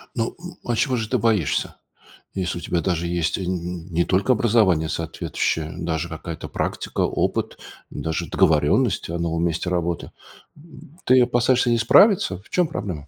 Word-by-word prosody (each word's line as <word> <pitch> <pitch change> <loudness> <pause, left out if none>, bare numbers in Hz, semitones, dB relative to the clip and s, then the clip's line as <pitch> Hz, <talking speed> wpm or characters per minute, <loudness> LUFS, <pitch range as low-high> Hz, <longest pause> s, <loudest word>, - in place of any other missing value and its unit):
Ну, 115 -1 -2
м, 175 0 -10
а 120 - 0
чего 130 +2 +1
же 110 -2 -2
ты 125 - +1
боишься, 105 - 0 0.6
если 90 -2 -2
у - - -6
тебя 85 +1 -1
даже 85 -2 -1
есть 85 -2 -1
н 90 -2 -4
не 85 +1 +1
только 100 +7 +2
образование 105 -9 +2
соответствующее, 80 -1 -2
даже 85 0 -2
какая-то 85 +1 -7
практика, - - -3
опыт, - - -1 0.3
даже 80 -1 -3
договорённость - - +2
о 85 0 -3
новом 85 0 -1
месте 85 +2 -1
работы? 85 -1 -2 0.5
М, 155 0 -16
ты 130 0 +6
опасаешься 120 0 +2
не 120 - +3
справиться? 115 - +4
В - - -23
чём 180 -3 +2
проблема? 90 - -5
90 Hz, 160 wpm, -22 LUFS, 85-120 Hz, 0.6 s, ты